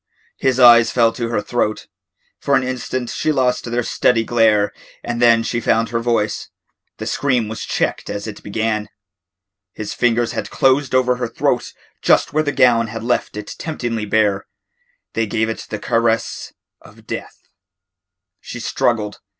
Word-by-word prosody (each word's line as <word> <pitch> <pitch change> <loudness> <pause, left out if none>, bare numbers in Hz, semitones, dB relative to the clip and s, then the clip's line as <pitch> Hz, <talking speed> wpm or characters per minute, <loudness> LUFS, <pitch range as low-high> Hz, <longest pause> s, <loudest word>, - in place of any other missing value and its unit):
His 130 -1 +1
eyes 120 -2 +8
fell 115 -2 +3
to 115 -2 -3
her 110 -3 -1
throat. 110 -2 -1 0.5
For 140 - +1
an 130 - +2
instant 130 -1 -3
she 155 - 0
lost 125 -3 +1
their 120 +1 -1
steady 115 0 +2
glare 110 -3 +2 0.3
and 120 0 -3
then 115 -1 +5
she 120 +1 -2
found 115 0 +1
her 115 0 -1
voice. 115 -3 -1 0.5
The - - -6
scream 130 -5 0
was 110 +1 -6
checked - - -2
as 100 0 -4
it 110 -2 -7
began. 105 0 -2 0.8
His 105 -1 -5
fingers 120 -1 +1
had - - -4
closed 135 0 +2
over 125 -1 +3
her 125 -1 -2
throat 115 - -1 0.3
just - - +3
where 155 - +3
the 145 - -1
gown 115 -4 +4
had 110 0 -6
left 120 -3 -1
it 105 - -6
temptingly 120 -9 -3
bare. 100 -2 +1 0.7
They 115 -1 0
gave 110 +1 0
it 110 - -5
the 105 - -3
caress 115 +1 -1 0.3
of - - -17
death. - - -6 1.0
She - - -8
struggled. 105 -3 -1
115 Hz, 160 wpm, -19 LUFS, 110-125 Hz, 1.0 s, eyes